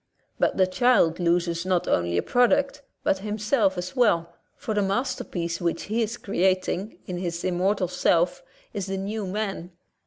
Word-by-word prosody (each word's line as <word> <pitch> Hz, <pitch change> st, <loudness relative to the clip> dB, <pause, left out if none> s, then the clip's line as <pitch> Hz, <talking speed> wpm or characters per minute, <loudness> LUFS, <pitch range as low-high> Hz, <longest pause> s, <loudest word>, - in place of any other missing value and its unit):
'' -, -, -43 dB
But -, -, +1 dB
the 190 Hz, -, +5 dB
child 185 Hz, -4 st, +3 dB
loses 170 Hz, -1 st, +1 dB
not 185 Hz, -1 st, 0 dB
only 85 Hz, 0 st, +1 dB
a -, -, +1 dB
product, 280 Hz, +3 st, +2 dB, 0.2 s
but 190 Hz, -, +1 dB
himself 210 Hz, 0 st, 0 dB
as 180 Hz, +1 st, -5 dB
well, 170 Hz, -9 st, +2 dB, 0.2 s
for 220 Hz, -, -4 dB
the 210 Hz, -, +1 dB
masterpiece 195 Hz, -5 st, -2 dB
which 170 Hz, -1 st, -1 dB
he 220 Hz, +3 st, -1 dB
is 225 Hz, +2 st, -2 dB
creating 190 Hz, 0 st, 0 dB
in 180 Hz, -1 st, -4 dB
his 170 Hz, -2 st, -3 dB
immortal 185 Hz, +1 st, +1 dB
self 175 Hz, 0 st, +1 dB, 0.3 s
is 200 Hz, -2 st, -3 dB
the 195 Hz, 0 st, -2 dB
new 200 Hz, +1 st, -3 dB
man. 195 Hz, -3 st, -3 dB
190 Hz, 165 wpm, -25 LUFS, 175-215 Hz, 0.3 s, the